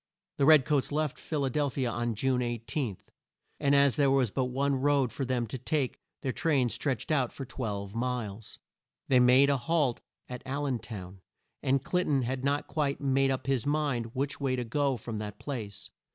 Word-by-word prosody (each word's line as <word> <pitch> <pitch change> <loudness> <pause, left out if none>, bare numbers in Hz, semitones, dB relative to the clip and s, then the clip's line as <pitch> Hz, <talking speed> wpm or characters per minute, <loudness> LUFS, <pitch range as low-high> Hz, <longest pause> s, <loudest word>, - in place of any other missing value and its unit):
The 140 - +3
red 155 -4 +7
coats 145 -3 +1
left 150 -1 -1
Phil 150 -3 -2
a - - 0
del 145 +1 +1
phi 135 - -4
a 125 -2 +1
on 120 0 -2
June 130 +3 +1
18, 120 - -2 0.6
and 140 0 +3
as 140 0 +4
there 140 -2 +4
was 135 -5 +2
but 130 +3 0
one 135 +2 0
road 140 -4 +2
for 135 - -3
them 125 -2 0
to 125 +4 -6
take, 135 +1 -1 0.2
their 135 - 0
train 135 -4 +1
stretched 135 +3 -2
out 135 -5 +2
for 135 - -7
twelve 100 -6 -4
miles. 115 -3 -4 0.5
They 130 - +6
made 130 +3 +6
a 140 - +2
halt 135 -1 0 0.3
at 125 -1 -7
Al 140 +2 -3
len 130 -4 -1
town, 95 -4 -9 0.4
and 135 +1 +1
Clin 180 0 +1
ton 140 -3 +2
had 130 +2 -3
not 140 +1 +1
quite 145 -3 -1
made 135 -1 +2
up 130 -1 -1
his 135 -1 0
mind 140 -6 -1
which 140 +2 -2
way 135 -2 +1
to 125 - -2
go 135 +2 0
from 115 -1 -6
that 105 -1 -5
place. 105 -8 -6
130 Hz, 205 wpm, -29 LUFS, 120-140 Hz, 0.6 s, red